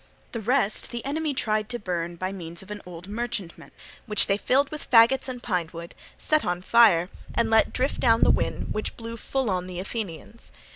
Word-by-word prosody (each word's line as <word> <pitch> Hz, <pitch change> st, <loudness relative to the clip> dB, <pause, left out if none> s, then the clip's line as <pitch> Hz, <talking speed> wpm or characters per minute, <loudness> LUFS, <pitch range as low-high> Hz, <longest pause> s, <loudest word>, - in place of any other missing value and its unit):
The 230 Hz, -, -4 dB
rest 235 Hz, -1 st, +1 dB
the 240 Hz, -1 st, -6 dB
enemy 295 Hz, +1 st, -1 dB
tried 215 Hz, -3 st, 0 dB
to 240 Hz, -, -2 dB
burn 175 Hz, -4 st, -3 dB
by 185 Hz, +2 st, -3 dB
means 170 Hz, -2 st, -7 dB
of 200 Hz, -, -12 dB
an 210 Hz, -1 st, -5 dB
old 175 Hz, 0 st, -9 dB
merchantman 215 Hz, -4 st, -5 dB, 0.4 s
which 210 Hz, -2 st, +3 dB
they 195 Hz, -, +2 dB
filled 270 Hz, +7 st, +1 dB
with 305 Hz, -, -7 dB
faggots 250 Hz, +3 st, +5 dB
and 245 Hz, -1 st, -6 dB
pine 180 Hz, -7 st, -1 dB
wood, 170 Hz, 0 st, -9 dB, 0.2 s
set 310 Hz, 0 st, +1 dB
on 180 Hz, 0 st, -2 dB
fire, 190 Hz, -6 st, +5 dB, 0.2 s
and 230 Hz, -1 st, +1 dB
let 220 Hz, 0 st, +4 dB
drift 260 Hz, +2 st, -1 dB
down 230 Hz, -2 st, +4 dB
the -, -, +6 dB
wind -, -, -1 dB
which 215 Hz, -, -4 dB
blew 230 Hz, 0 st, -6 dB
full 265 Hz, +2 st, -2 dB
on 180 Hz, -1 st, -2 dB
the 180 Hz, -1 st, -6 dB
Athenians. 205 Hz, +1 st, -6 dB
215 Hz, 200 wpm, -25 LUFS, 180-240 Hz, 0.4 s, the